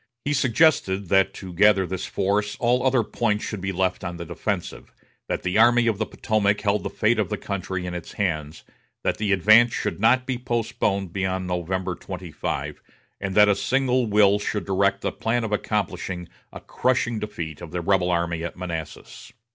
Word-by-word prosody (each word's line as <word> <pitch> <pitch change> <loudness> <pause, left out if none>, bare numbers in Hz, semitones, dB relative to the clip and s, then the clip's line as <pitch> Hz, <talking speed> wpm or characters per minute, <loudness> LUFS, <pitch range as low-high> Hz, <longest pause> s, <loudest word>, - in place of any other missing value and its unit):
He 145 - +1
suggested 120 - +2
that 95 -1 +4
to 95 -2 -8
gather 100 +1 +4
this 95 +1 -4
force 105 +2 0
all 125 +1 +2
other 130 -3 +3
points 105 -1 -1
should 105 -4 -5
be 95 0 -2
left 95 0 -1
on 85 -1 -5
the 85 - -6
defensive; 90 +2 -4 0.4
that - - -2
the 90 +4 +1
Army 120 +1 +5
of 110 -3 0
the 110 - -1
Potomac 105 -2 0
held 105 0 +1
the - - -4
fate 110 +1 +1
of 100 -5 0
the - - -2
country 95 -2 -4
in 90 - -4
its 90 -1 -7
hands; 80 -6 -3 0.4
that - - 0
the 105 -1 0
advance 110 +5 +5
should - - -3
not 125 +4 +3
be 130 -2 -2
postponed 110 -6 -1
beyond 95 -1 -1
November 90 +1 -2
25; - - -5 0.4
and 95 -1 -4
that 105 0 +7
a 100 - +5
single 130 0 +1
will 105 -1 +4
should 105 -2 -3
direct 100 +1 +1
the - - -1
plan 115 +1 -1
of 110 - -3
accomplishing 95 -4 -2 0.2
a - - -9
crushing 120 -3 0
defeat 85 -8 -6
of 85 - -8
the 90 - -3
rebel 90 0 +2
army 85 -1 -1
at 85 - -5
Manassas. 85 -4 -7
100 Hz, 185 wpm, -24 LUFS, 90-110 Hz, 0.4 s, that